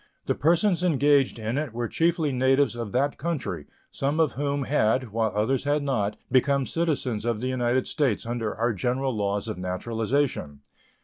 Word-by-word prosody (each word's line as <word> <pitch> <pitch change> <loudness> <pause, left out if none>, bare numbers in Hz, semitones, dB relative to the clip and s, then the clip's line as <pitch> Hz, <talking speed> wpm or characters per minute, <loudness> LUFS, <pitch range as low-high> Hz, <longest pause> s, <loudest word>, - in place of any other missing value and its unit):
The - - +1
persons 175 +4 +2
engaged 145 -6 +3
in 115 +4 -2
it 150 -7 -4
were 120 0 -2
chiefly 165 - +1
natives 130 0 +2
of 115 -3 -5
that 140 +3 0
country, 165 -3 -3 0.2
some 140 +3 -1
of 160 -2 +3
whom 140 0 -1
had, 130 -3 +1
while 110 0 0
others 120 +6 +1
had 145 0 +1
not, 110 -7 0 0.2
become 140 +1 +3
citizens 140 -10 -1
of 120 -2 -1
the 130 +3 -2
United 125 0 +1
States 135 -10 0
under 115 -2 -3
our 115 +2 0
general 125 +6 -1
laws 100 +1 -1
of 110 -4 -4
naturalization. 110 - -2
130 Hz, 170 wpm, -26 LUFS, 115-145 Hz, 0.2 s, engaged